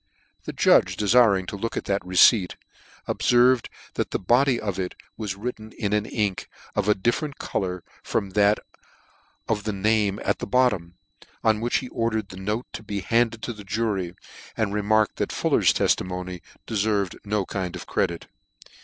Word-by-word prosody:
The - - -4
judge - - +4
defiring 105 -3 +4
to 100 - -5
look 115 +3 -4
at - - -3
that 100 0 -1
receipt, 90 +2 +5 0.5
ob - - -2
ferved 125 0 +4 0.3
that - - -2
the - - -1
body 120 +5 +3
of 100 -3 -3
it 90 -1 -3 0.2
was 105 -4 -4
written 110 0 -6
with 100 -1 -1
an 105 0 +1
ink 105 -4 -2 0.3
of 105 0 +1
a 105 - +5
different 120 +8 -1
colour 90 -2 -3 0.2
from 100 - -2
that 105 +1 +4 0.9
of 105 -2 -1
the 105 0 -2
name 105 0 +1
at - - +1
the - - -5
bottom: 105 -10 +1 0.5
on 110 -1 +3
which 120 +1 +1
he - - -8
ordered 110 -3 -1
the 95 - -10
note 105 +5 -2
to - - -6
be 100 -2 -4
handed 115 +3 +1
to 120 - -3
the 105 -1 -11
jury, 100 -4 -2 0.4
and 105 -3 0
remarked 105 0 +2
that - - -1
Fuller's - - +3
teftimony 90 -1 -1 0.2
cleferved 105 -3 0
no 105 -1 -1
kind 95 -2 -4
of - - -7
credit. 85 -1 -1
105 Hz, 170 wpm, -25 LUFS, 95-115 Hz, 0.9 s, receipt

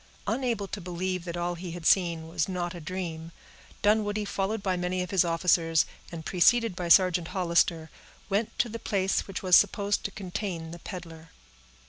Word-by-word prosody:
Unable 235 -6 -1
to 205 - -5
believe 180 0 -3
that 170 -1 -4
all 175 0 -1
he 175 0 -7
had 175 -2 -8
seen 170 -4 +3
was 165 0 -1
not 175 -1 -3
a 175 - -8
dream, 165 -1 -5 0.5
Dunwoodie, 210 0 +2
followed 200 +1 -2
by 185 -2 +1
many 180 +1 -1
of 180 - -7
his 190 -3 +4
officers, 165 -1 +2 0.3
and 165 -2 -7
preceded 225 +3 +3
by 175 -1 -3
Sergeant 180 -2 +5
Hollister, 170 -3 +1 0.4
went 210 +2 -1
to - - +2
the 230 0 -6
place 195 -3 0
which 195 -1 -6
was 180 -1 +6
supposed 205 0 +3
to - - 0
contain 180 -4 -5
the 170 - -9
peddler. 165 -2 -9
180 Hz, 175 wpm, -28 LUFS, 170-195 Hz, 0.5 s, was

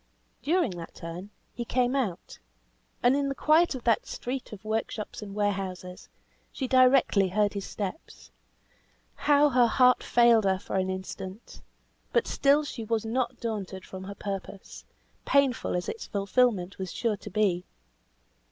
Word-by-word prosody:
During 335 - +1
that 165 - -9
turn 170 +4 -7 0.2
he 240 - -4
came 250 +2 +1
out, 215 -11 -3 0.6
and 245 +2 +5
in 280 -1 0
the 275 - -3
quiet 310 +1 +3
of 250 - -7
that 230 -2 +2
street 255 +1 -5
of 210 0 -10
workshops 220 0 -3
and 200 -1 -8
warehouses, 190 -3 -3 0.4
she 265 - -3
directly 255 -6 +4
heard 205 +2 +1
his 200 -2 -5
steps. 205 - -7 1.0
Now 295 0 +6
her 245 -2 +4
heart 250 +2 +4
failed 235 -3 +4
her 190 -1 +2
for 190 - -4
an 190 0 0
instant; 190 +2 -7 0.5
but 475 - +3
still 285 +2 +3
she 265 -5 -6
was 225 0 -1
not 245 +2 -1
daunted 200 -5 -4
from 190 0 -8
her 200 +1 -7
purpose, 195 -1 -7 0.4
painful 275 -8 +2
as 180 - -2
its 455 - -5
fulfilment 200 -2 +1
was 185 -1 -4
sure 225 -3 -1
to 210 - -9
be. 190 -3 +1
220 Hz, 150 wpm, -28 LUFS, 190-255 Hz, 1.0 s, Now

